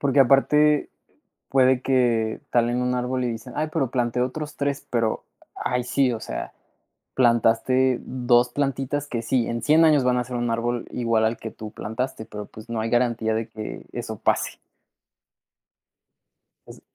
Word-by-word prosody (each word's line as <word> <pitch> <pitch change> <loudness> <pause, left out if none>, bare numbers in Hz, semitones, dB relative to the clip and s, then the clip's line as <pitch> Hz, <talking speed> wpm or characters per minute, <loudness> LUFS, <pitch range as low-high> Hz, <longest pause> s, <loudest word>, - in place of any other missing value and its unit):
porque, 140 -1 +3
aparte, 150 +3 +4 0.6
puede 130 -1 +4
que 120 -3 +1
talen 120 +1 +1
1 125 0 0
árbol 125 +1 -1
y 120 - 0
dicen: 115 +2 -8
"Ay, 155 +1 -1
pero 135 -6 -1
planté 125 -1 0
otros 150 +4 -3
3", 140 0 -2
pero, 115 -2 -1 0.3
ay, 125 0 -1
sí, 130 0 +1
o 115 - -3
sea, - - -6 0.6
plantaste 120 +1 +3
2 125 -1 +2
plantitas 140 +1 -2
que 115 -4 -3
sí, 120 +1 0
en 115 -1 -3
100 155 +6 +5
años 150 -4 +4
van 125 0 +2
a 125 - +1
ser 125 +1 -7
1 120 0 -1
árbol 120 +1 -2
igual 115 -2 +1
al 110 +1 0
que 110 - -7
tú 110 -1 -9
plantaste, 110 +2 -4
pero, 105 -1 -7
pues, 110 +1 -13
no 115 -2 -2
hay 115 - -2
garantía 120 -2 +1
de 115 0 -3
que 110 0 -7
eso - - -5
pase. - - 0 2.1
Eso - - -12
125 Hz, 165 wpm, -24 LUFS, 115-130 Hz, 2.1 s, 100